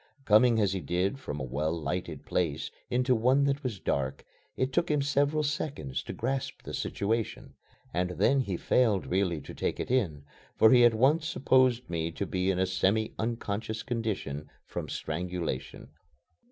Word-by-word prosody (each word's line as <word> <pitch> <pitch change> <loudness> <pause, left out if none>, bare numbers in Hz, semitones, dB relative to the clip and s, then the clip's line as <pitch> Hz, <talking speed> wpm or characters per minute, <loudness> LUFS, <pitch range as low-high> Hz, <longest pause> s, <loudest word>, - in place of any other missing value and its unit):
Coming 110 +2 +5
as 100 -3 +2
he 95 - -2
did 90 - -1
from 75 - -5
a - - -3
well 70 +5 -1
lighted 80 0 -3
room 80 -5 +1 0.3
into 125 +1 +2
one 125 +4 +3
that 140 0 +1
was 120 -8 -4
dark, 70 -4 -2 0.3
it 130 0 0
took 170 - +1
him 150 -1 +2
several 145 +2 +2
seconds 145 - -2
to - - -7
grasp 130 +2 -3
the - - -7
situation 110 +2 -2 0.4
and 90 +2 0
then 100 - +2
he 100 -9 -1
failed 110 -4 +2
really 90 -3 0
to - - -9
take - - -2
it - - -3
in, 85 - 0 0.3
for 110 - +6
he 125 -1 +7
at 115 -1 +5
once 150 +7 +3
supposed 130 -3 +3
me 85 -1 -2
to 100 - -3
be 95 0 -1
in 95 - +1
a 95 - +2
semi 100 +4 +1
unconscious 110 -1 -3
condition 105 - -3 0.2
from - - -5
strangulation. 85 -5 -4
105 Hz, 170 wpm, -29 LUFS, 90-130 Hz, 0.4 s, he